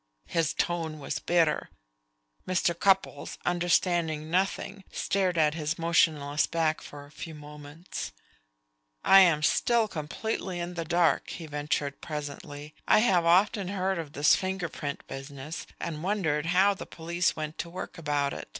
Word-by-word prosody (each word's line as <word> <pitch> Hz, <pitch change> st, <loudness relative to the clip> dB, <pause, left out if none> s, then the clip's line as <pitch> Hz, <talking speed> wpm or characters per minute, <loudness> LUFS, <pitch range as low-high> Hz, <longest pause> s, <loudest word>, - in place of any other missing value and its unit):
His 165 Hz, -2 st, 0 dB
tone 165 Hz, -3 st, -1 dB
was 145 Hz, 0 st, -4 dB
bitter. 165 Hz, -3 st, +1 dB, 0.8 s
Mr. 180 Hz, -1 st, +2 dB
Cupples, 190 Hz, -4 st, +1 dB
understanding 170 Hz, -3 st, +1 dB
nothing, 195 Hz, +2 st, -1 dB
stared 185 Hz, -3 st, 0 dB
at 150 Hz, -2 st, +4 dB
his 160 Hz, 0 st, -2 dB
motionless 155 Hz, -3 st, +2 dB
back 160 Hz, -2 st, 0 dB
for 145 Hz, -1 st, -10 dB
a 145 Hz, -, -18 dB
few 160 Hz, +1 st, -8 dB
moments. 150 Hz, +2 st, -8 dB, 0.9 s
"I 195 Hz, -, +8 dB
am 165 Hz, -5 st, +5 dB
still 230 Hz, +7 st, +3 dB
completely 180 Hz, +2 st, -4 dB
in 175 Hz, +1 st, -4 dB
the 165 Hz, -1 st, -4 dB
dark," 170 Hz, +1 st, +2 dB
he 170 Hz, -, -6 dB
ventured 145 Hz, -1 st, -2 dB
presently. 145 Hz, -1 st, -6 dB
"I -, -, +6 dB
have 185 Hz, -7 st, +3 dB
often 190 Hz, +3 st, +3 dB
heard 190 Hz, -1 st, -1 dB
of 150 Hz, -3 st, -6 dB
this 145 Hz, +3 st, +5 dB
finger 190 Hz, -2 st, -2 dB
print 140 Hz, -1 st, -5 dB
business, 140 Hz, +3 st, -7 dB
and 155 Hz, -2 st, -4 dB
wondered 165 Hz, -5 st, 0 dB
how 190 Hz, +3 st, +4 dB
the 195 Hz, -, -9 dB
police 170 Hz, +2 st, -1 dB
went 155 Hz, 0 st, -5 dB
to 170 Hz, -, -3 dB
work 180 Hz, 0 st, -7 dB
about 145 Hz, -3 st, 0 dB
it. -, -, -7 dB
165 Hz, 150 wpm, -28 LUFS, 150-180 Hz, 0.9 s, I